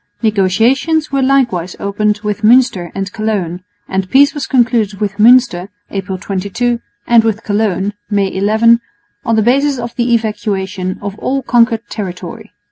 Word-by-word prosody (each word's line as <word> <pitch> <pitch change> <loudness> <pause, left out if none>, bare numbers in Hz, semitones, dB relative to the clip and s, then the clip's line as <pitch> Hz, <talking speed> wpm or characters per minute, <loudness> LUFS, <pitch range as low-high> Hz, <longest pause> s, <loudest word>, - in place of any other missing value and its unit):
Negotiations 230 - +1
were 275 -1 0
likewise 240 -10 +1
opened 210 +1 -1
with 210 0 -3
Münster 230 -6 +3
and 195 +1 -4
Cologne; 205 -6 -2 0.3
and 190 -1 -2
peace 280 +1 +4
was 290 -3 -4
concluded 230 -5 +1
with 200 -2 -3
Münster 220 -5 +4 0.2
(April 190 -1 -4
22) 200 +6 -2 0.3
and 235 -1 +4
with 220 -1 -1
Cologne 205 -1 -1 0.2
(May 200 -2 0
11) 220 +4 +3 0.4
on 230 - 0
the 220 - +2
basis 275 +4 +2
of 235 -1 -6
the 240 0 0
evacuation 195 -4 -3
of 200 +1 -6
all 270 0 -2
conquered 235 -1 +2
territory. 180 -4 -7
215 Hz, 145 wpm, -14 LUFS, 195-240 Hz, 0.4 s, peace